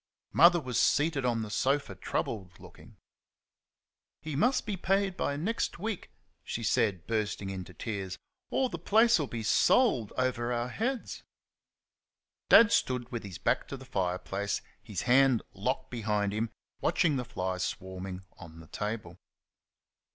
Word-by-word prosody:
Mother 175 +4 +7
was 130 -6 -2
seated 145 -3 +2
on 115 -2 +1
the 105 - -7
sofa, 135 0 +1
troubled 95 -1 -4
looking. - - -15 1.2
"He 155 -1 -5
must 245 - +2
be 210 -3 -2
paid 195 +1 +1
by 140 -5 -1
next 205 +10 -1
week," 210 +1 -4 0.3
she 115 - -4
said, 100 -4 +1
bursting 105 -3 -2
into 95 -1 -7
tears, 100 -5 -4 0.3
"or 265 - +1
the 170 - -6
place'll 215 - +4
be 115 -2 -5
sold 120 - +3
over 125 -2 0
our 120 0 -1
heads." 245 - -3 1.3
Dad 230 -1 +8
stood 125 - +1
with 120 -2 -3
his 95 -4 -7
back - - 0
to 140 - -6
the 130 - -12
fire 90 -6 -1
place, 100 +2 -3 0.2
his 100 -4 -5
hand 130 -1 +4
locked 105 +7 -2
behind 105 -4 0
him, 110 +2 -1 0.3
watching 155 -5 +2
the 125 - -2
flies 95 -6 -3
swarming 95 0 -5
on 80 -1 -11
the 80 - -14
table. 105 -5 -4
120 Hz, 145 wpm, -30 LUFS, 100-150 Hz, 1.3 s, Dad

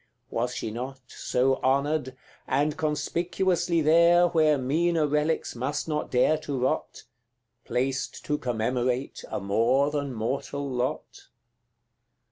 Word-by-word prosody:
Was 120 +2 -1
she 110 - -4
not 130 +4 -6
So 130 +1 0
honoured 135 0 0 0.3
and 145 +3 +1
conspicuously 170 +3 0
there, 170 +3 +5
Where 155 -3 +3
meaner 160 +5 +1
relics 150 +1 0
must 140 +6 -2
not 150 -1 -2
dare 140 +5 +3
to 145 -3 -4
rot, 130 - -2 0.6
Placed 130 +2 -2
to 150 0 -1
commemorate 125 +2 -1
a - - -3
more 115 +8 +2
than 145 -2 -2
mortal 135 +5 -3
lot? 125 -1 -4
140 Hz, 115 wpm, -27 LUFS, 125-155 Hz, 0.6 s, there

